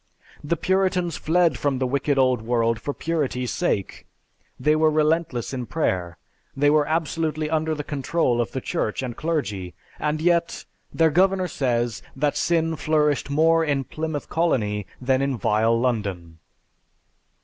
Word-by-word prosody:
The 165 Hz, +3 st, -1 dB
Puritans 185 Hz, -2 st, +1 dB
fled 165 Hz, -4 st, +2 dB
from 140 Hz, -2 st, 0 dB
the 130 Hz, -, 0 dB
wicked 140 Hz, +2 st, 0 dB
old 130 Hz, -3 st, +3 dB
world 115 Hz, -1 st, 0 dB
for 145 Hz, -, -2 dB
purity's 140 Hz, -6 st, -2 dB
sake, 105 Hz, -, -2 dB, 0.5 s
they 150 Hz, +1 st, +3 dB
were 155 Hz, 0 st, +4 dB
relentless 155 Hz, -5 st, 0 dB
in 125 Hz, -3 st, -4 dB
prayer, 90 Hz, -, -1 dB, 0.4 s
they 145 Hz, +1 st, +4 dB
were 150 Hz, -1 st, +3 dB
absolutely 155 Hz, -1 st, -1 dB
under 160 Hz, 0 st, 0 dB
the 150 Hz, -, -4 dB
control 140 Hz, -3 st, 0 dB
of 115 Hz, -, -3 dB
the 130 Hz, -, -4 dB
church 110 Hz, +2 st, -2 dB
and 120 Hz, -2 st, -4 dB
clergy, 105 Hz, -, -3 dB, 0.2 s
and 150 Hz, 0 st, -1 dB
yet, 170 Hz, +1 st, +1 dB, 0.3 s
their 160 Hz, -1 st, +3 dB
Governor 185 Hz, +3 st, +3 dB
says 120 Hz, -6 st, -1 dB
that 145 Hz, +1 st, 0 dB
sin 165 Hz, -1 st, +1 dB
flourished 150 Hz, -1 st, +1 dB
more 165 Hz, +3 st, +3 dB
in 140 Hz, -3 st, 0 dB
Plymouth 155 Hz, 0 st, -4 dB
Colony 105 Hz, -, 0 dB
than 130 Hz, +1 st, +1 dB
in 135 Hz, -2 st, 0 dB
vile 110 Hz, +3 st, +2 dB
London! 100 Hz, -9 st, -2 dB
145 Hz, 150 wpm, -23 LUFS, 120-160 Hz, 0.5 s, were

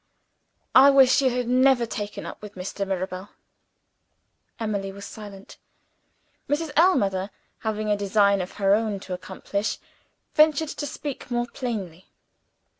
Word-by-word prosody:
"I 270 Hz, +2 st, +9 dB
wish 270 Hz, -1 st, +6 dB
you 265 Hz, -, +3 dB
had 250 Hz, -1 st, -2 dB
never 255 Hz, 0 st, +4 dB
taken 210 Hz, -2 st, -5 dB
up -, -, -8 dB
with 210 Hz, -1 st, -10 dB
Mr. 195 Hz, +2 st, -4 dB
Mirabel." 185 Hz, +1 st, -4 dB, 1.3 s
Emily 200 Hz, -3 st, -2 dB
was 200 Hz, +1 st, -9 dB
silent. 200 Hz, -2 st, -11 dB, 0.9 s
Mrs. 300 Hz, +2 st, -1 dB
Ellmother, 200 Hz, -, +3 dB, 0.3 s
having 215 Hz, -1 st, -2 dB
a -, -, +4 dB
design 200 Hz, -1 st, +3 dB
of 180 Hz, -, -6 dB
her 195 Hz, -1 st, +2 dB
own 215 Hz, -2 st, 0 dB
to 185 Hz, -, -6 dB
accomplish, 200 Hz, +3 st, -3 dB, 0.6 s
ventured 305 Hz, 0 st, +4 dB
to 290 Hz, -, -4 dB
speak 290 Hz, -2 st, -6 dB
more 240 Hz, -1 st, 0 dB
plainly. 205 Hz, -, -5 dB
210 Hz, 130 wpm, -25 LUFS, 195-260 Hz, 1.3 s, I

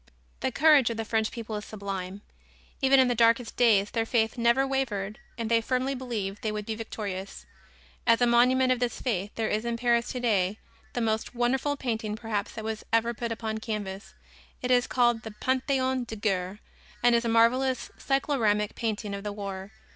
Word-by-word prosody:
The 260 Hz, -, -1 dB
courage 295 Hz, -3 st, +5 dB
of 230 Hz, -, -4 dB
the 225 Hz, -, -3 dB
French 220 Hz, 0 st, 0 dB
people 225 Hz, -2 st, -6 dB
is 210 Hz, -, -6 dB
sublime. 195 Hz, -2 st, -5 dB, 0.6 s
Even 270 Hz, 0 st, +5 dB
in 260 Hz, -, +5 dB
the 245 Hz, -, +2 dB
darkest 230 Hz, 0 st, +3 dB
days 210 Hz, -4 st, +4 dB
their 225 Hz, -, 0 dB
faith 225 Hz, -1 st, +1 dB
never 235 Hz, +2 st, +3 dB
wavered 225 Hz, -7 st, -2 dB, 0.2 s
and 230 Hz, -1 st, -2 dB
they 230 Hz, 0 st, +3 dB
firmly 255 Hz, +3 st, 0 dB
believed 220 Hz, -7 st, -4 dB
they 215 Hz, -, -1 dB
would 210 Hz, -1 st, -4 dB
be 220 Hz, -, -2 dB
victorious. 205 Hz, -3 st, -6 dB, 0.6 s
As 230 Hz, -1 st, +5 dB
a 245 Hz, -, +4 dB
monument 250 Hz, +2 st, +4 dB
of 255 Hz, -, +2 dB
this 245 Hz, -1 st, -1 dB
faith 205 Hz, -6 st, -1 dB
there 225 Hz, -1 st, -1 dB
is 215 Hz, +1 st, 0 dB
in 235 Hz, 0 st, -2 dB
Paris 235 Hz, 0 st, +1 dB
today 210 Hz, -6 st, +1 dB, 0.4 s
the 245 Hz, -, -1 dB
most 220 Hz, +2 st, -1 dB
wonderful 265 Hz, +4 st, +1 dB
painting 220 Hz, -5 st, -2 dB
perhaps 220 Hz, -2 st, -3 dB
that 220 Hz, -, -6 dB
was 220 Hz, -1 st, -4 dB
ever 230 Hz, +1 st, +2 dB
put 235 Hz, 0 st, -4 dB
upon 220 Hz, -1 st, -3 dB
canvas. 205 Hz, -3 st, -5 dB, 0.5 s
It 250 Hz, -, 0 dB
is 245 Hz, -1 st, +4 dB
called 240 Hz, -2 st, +2 dB
the 220 Hz, -1 st, -9 dB
"Pantheon 260 Hz, -1 st, 0 dB
de 225 Hz, -, -6 dB
Guerre" 195 Hz, -1 st, -2 dB, 0.4 s
and 240 Hz, 0 st, +5 dB
is 235 Hz, 0 st, +3 dB
a 235 Hz, -, -1 dB
marvelous 250 Hz, +3 st, +2 dB
cycloramic 230 Hz, -7 st, +1 dB
painting 215 Hz, -2 st, -3 dB
of 200 Hz, 0 st, -5 dB
the 210 Hz, -, -3 dB
war. 200 Hz, -1 st, -6 dB
230 Hz, 190 wpm, -27 LUFS, 210-245 Hz, 0.6 s, courage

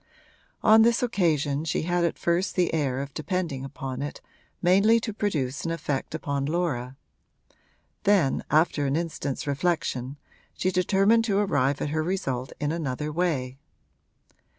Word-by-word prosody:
On 220 Hz, +1 st, +7 dB
this 235 Hz, +2 st, +3 dB
occasion 155 Hz, -, +1 dB
she 160 Hz, -, -1 dB
had 175 Hz, +1 st, +1 dB
at 170 Hz, -, 0 dB
first 170 Hz, +3 st, 0 dB
the 180 Hz, -3 st, +1 dB
air 135 Hz, -4 st, 0 dB
of 140 Hz, 0 st, -10 dB
depending 160 Hz, -5 st, -3 dB
upon 135 Hz, -1 st, -6 dB
it 145 Hz, -, -5 dB, 0.4 s
mainly 200 Hz, +6 st, +4 dB
to 220 Hz, -1 st, -4 dB
produce 150 Hz, -, -2 dB
an 165 Hz, -, -2 dB
effect 155 Hz, -3 st, -3 dB
upon 140 Hz, -3 st, -2 dB
Laura; 145 Hz, -7 st, -2 dB, 1.1 s
then, 195 Hz, -9 st, +2 dB
after 155 Hz, -2 st, +2 dB
an 135 Hz, -, 0 dB
instant's 160 Hz, -3 st, -3 dB
reflection, 140 Hz, -3 st, -1 dB, 0.4 s
she 185 Hz, -, 0 dB
determined 195 Hz, +5 st, +3 dB
to 200 Hz, -3 st, +1 dB
arrive 145 Hz, -9 st, +1 dB
at -, -, -2 dB
her 155 Hz, +1 st, 0 dB
result 135 Hz, -8 st, -2 dB
in 145 Hz, 0 st, -1 dB
another 150 Hz, -2 st, -3 dB
way. 150 Hz, -6 st, -1 dB
160 Hz, 145 wpm, -26 LUFS, 140-180 Hz, 1.1 s, On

